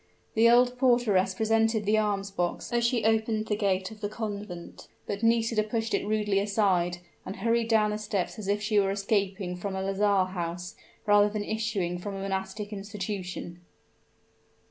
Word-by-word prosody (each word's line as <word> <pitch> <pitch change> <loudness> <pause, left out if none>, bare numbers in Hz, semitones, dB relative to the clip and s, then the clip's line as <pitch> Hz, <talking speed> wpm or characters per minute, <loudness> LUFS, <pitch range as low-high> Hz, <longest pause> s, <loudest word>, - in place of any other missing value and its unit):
The 225 +1 +5
old 245 +1 +4
porteress 220 -7 +3
presented 225 0 +2
the 215 +1 +3
alms 200 -2 -1
box 175 +4 -3
as 240 0 +2
she 235 -2 +1
opened 220 0 +1
the 210 - 0
gate 195 -2 0
of 215 -1 -12
the 205 - -2
convent; 205 -5 -6 0.2
but 200 0 -4
Nisida 230 -1 +2
pushed 225 +1 -2
it - - 0
rudely 210 -2 +1
aside, 195 -4 +1 0.3
and 190 - -6
hurried 230 +1 +1
down 215 -2 +3
the 210 - -3
steps 210 0 -3
as 205 - -6
if 205 +1 0
she 215 0 +3
were 195 -1 +2
escaping 195 -2 -1
from 190 +2 -4
a 190 - -2
lazar 195 0 +2
house, 175 0 -4 0.3
rather 205 0 +5
than 210 0 -3
issuing 205 -6 -2
from 200 +2 -5
a 195 - -5
monastic 195 +2 -4
institution. 195 -3 -5
205 Hz, 170 wpm, -28 LUFS, 195-220 Hz, 0.3 s, The